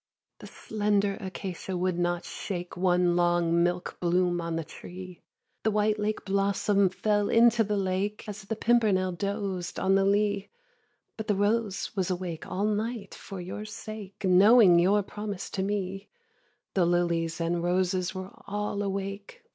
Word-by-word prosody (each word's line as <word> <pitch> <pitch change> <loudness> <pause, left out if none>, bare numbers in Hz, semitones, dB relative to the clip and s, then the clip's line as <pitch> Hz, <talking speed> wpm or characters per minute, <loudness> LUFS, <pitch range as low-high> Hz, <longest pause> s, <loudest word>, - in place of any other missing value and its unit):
8. - - -59
The - - -10
slender 205 -2 0
acacia 190 -1 -5
would 180 -1 0
not 175 0 0
shake 180 -3 -5
One 180 -1 +2
long 175 -1 +2
milk 175 +1 -1
bloom 175 0 +1
on 165 -1 -3
the 165 - -2
tree; 180 +3 -10 0.4
The 220 - +1
white 210 0 +1
lake 210 +1 -2
blossom 200 0 +2
fell 205 +2 0
into 230 0 +5
the 210 0 -1
lake, 195 +3 -2
As 210 0 -6
the 200 +3 -4
pimpernel 215 -5 +2
dozed 200 -1 -3
on 190 - +2
the 195 0 +4
lea; 205 0 +1 0.7
But 220 - -5
the 210 - +2
rose 205 0 0
was 190 -2 0
awake 175 -3 -4
all 195 +3 -1
night 215 0 -2
for 195 - -8
your 185 +4 -6
sake, 215 -2 -8
Knowing 190 0 +7
your 200 +4 +3
promise 205 -1 -6
to 190 - -2
me; 195 0 -3 0.6
The 180 -3 +3
lilies 170 -1 0
and 170 +1 0
roses 185 +1 0
were 185 +1 -6 0.2
all 205 0 -2
awake. 200 - -4
195 Hz, 155 wpm, -28 LUFS, 180-210 Hz, 0.7 s, Knowing